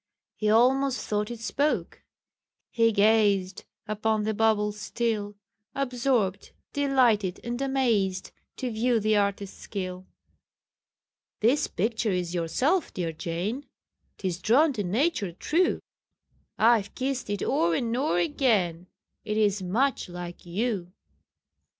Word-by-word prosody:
He 215 Hz, -, 0 dB
almost 255 Hz, +4 st, +3 dB
thought 210 Hz, 0 st, -1 dB
it 240 Hz, -1 st, -6 dB
spoke: 285 Hz, +6 st, -1 dB, 0.7 s
he 230 Hz, -1 st, +3 dB
gazed 200 Hz, -3 st, +2 dB, 0.2 s
Upon 215 Hz, 0 st, 0 dB
the 215 Hz, +1 st, 0 dB
bauble 210 Hz, -1 st, +2 dB
still, 210 Hz, -1 st, -3 dB, 0.4 s
Absorbed, 245 Hz, -7 st, 0 dB, 0.2 s
delighted, 245 Hz, -9 st, +2 dB
and 240 Hz, +2 st, -4 dB
amazed, 230 Hz, -9 st, 0 dB, 0.3 s
To 255 Hz, -2 st, -3 dB
view 230 Hz, +1 st, +1 dB
the 215 Hz, 0 st, +2 dB
artist's 200 Hz, -1 st, -1 dB
skill. 185 Hz, -2 st, -6 dB, 1.3 s
"This 255 Hz, +7 st, +3 dB
picture 220 Hz, +3 st, -1 dB
is 180 Hz, -2 st, -1 dB
yourself, 250 Hz, -, 0 dB
dear 170 Hz, -3 st, -3 dB
Jane 180 Hz, -, -4 dB, 0.5 s
'Tis 180 Hz, -3 st, -3 dB
drawn 275 Hz, -, +4 dB
to 210 Hz, -5 st, -2 dB
nature 215 Hz, -, 0 dB
true: 335 Hz, -, +1 dB, 0.8 s
I've 220 Hz, -3 st, +3 dB
kissed 260 Hz, -3 st, -2 dB
it 205 Hz, -1 st, -2 dB
o'er 170 Hz, 0 st, +2 dB
and 230 Hz, +3 st, -1 dB
o'er 255 Hz, -, +1 dB
again, 175 Hz, -, +1 dB, 0.4 s
It 215 Hz, -1 st, -2 dB
is 205 Hz, -2 st, +2 dB
much 230 Hz, +6 st, 0 dB
like 175 Hz, 0 st, -8 dB
you." 185 Hz, -1 st, -2 dB
215 Hz, 120 wpm, -27 LUFS, 190-245 Hz, 1.3 s, drawn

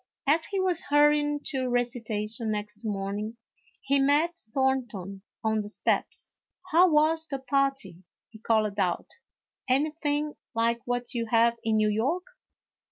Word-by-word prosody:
As 315 Hz, +3 st, +3 dB
he 395 Hz, -, -2 dB
was 370 Hz, -2 st, +1 dB
hurrying 295 Hz, 0 st, +3 dB
to 260 Hz, -3 st, -1 dB
recitation 230 Hz, -2 st, -2 dB
next 210 Hz, 0 st, -4 dB
morning, 205 Hz, +1 st, -3 dB, 0.4 s
he 275 Hz, +1 st, +2 dB
met 295 Hz, +5 st, +3 dB, 0.2 s
Thornton 230 Hz, -8 st, -1 dB, 0.2 s
on 220 Hz, -1 st, +1 dB
the 205 Hz, -, -6 dB
steps. -, -, -2 dB, 0.2 s
" -, -, -21 dB
How 355 Hz, +3 st, +6 dB
was 320 Hz, +1 st, +3 dB
the 275 Hz, -, -3 dB
party? 270 Hz, -, -1 dB
" -, -, -67 dB
he 220 Hz, -, -13 dB
called 215 Hz, -2 st, +1 dB
out; 180 Hz, -3 st, 0 dB, 0.3 s
" -, -, -22 dB
anything 295 Hz, +2 st, 0 dB, 0.2 s
like 230 Hz, +1 st, +1 dB
what 245 Hz, 0 st, -2 dB
you 230 Hz, -2 st, -2 dB
have 230 Hz, +1 st, +3 dB
in 220 Hz, -1 st, +2 dB
New 215 Hz, 0 st, +3 dB
York 270 Hz, -, 0 dB
245 Hz, 150 wpm, -27 LUFS, 215-295 Hz, 0.4 s, How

